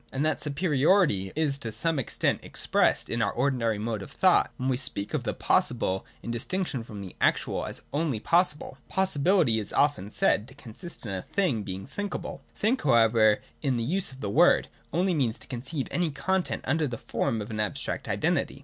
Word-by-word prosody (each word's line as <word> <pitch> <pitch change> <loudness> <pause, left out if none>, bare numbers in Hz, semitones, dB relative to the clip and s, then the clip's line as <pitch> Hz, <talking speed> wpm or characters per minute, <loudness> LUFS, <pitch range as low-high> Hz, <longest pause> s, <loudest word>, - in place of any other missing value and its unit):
And 135 +3 -1
that 155 -2 +1
superiority 150 - +2
is 145 -3 0
to 115 -5 -4
some 165 +5 0
extent 130 - -1
expressed - - +2
in 115 - -2
our 100 - +1
ordinary 120 -4 0
mode 110 0 -3
of - - -8
thought 185 -1 +3
when 130 -2 -2
we 130 - +2
speak 105 -5 -2
of - - -1
the - - -1
possible, 95 +1 0 0.2
in 115 - -4
distinction 140 +3 -2
from 105 -3 -8
the 95 -2 -9
actual, - - +1
as - - -6
only 145 -6 0
possible. 150 - +1
Possibility 180 - +2
is 105 - -6
often 145 -9 +1
said 105 +1 +2
to 135 - -14
consist 140 - -9
in 105 - -4
a 95 - -3
thing's 140 - -1
being 95 0 -5
thinkable. 205 -2 -5
' - - -35
Think,' 230 +5 +1
however, 115 -5 +4 0.2
in 135 -5 0
this 115 - -1
use 180 +6 0
of 130 0 -13
the 100 - -2
word, - - +4 0.2
only 180 +4 +1
means 125 -8 0
to - - -7
conceive 130 +3 -4
any 175 -2 +1
content 190 +6 -1
under 155 +3 +1
the 120 -3 -5
form 115 -1 -2
of 105 +2 -6
an 110 - -4
abstract 105 -4 -3
identity. - - 0
135 Hz, 195 wpm, -27 LUFS, 110-160 Hz, 0.2 s, however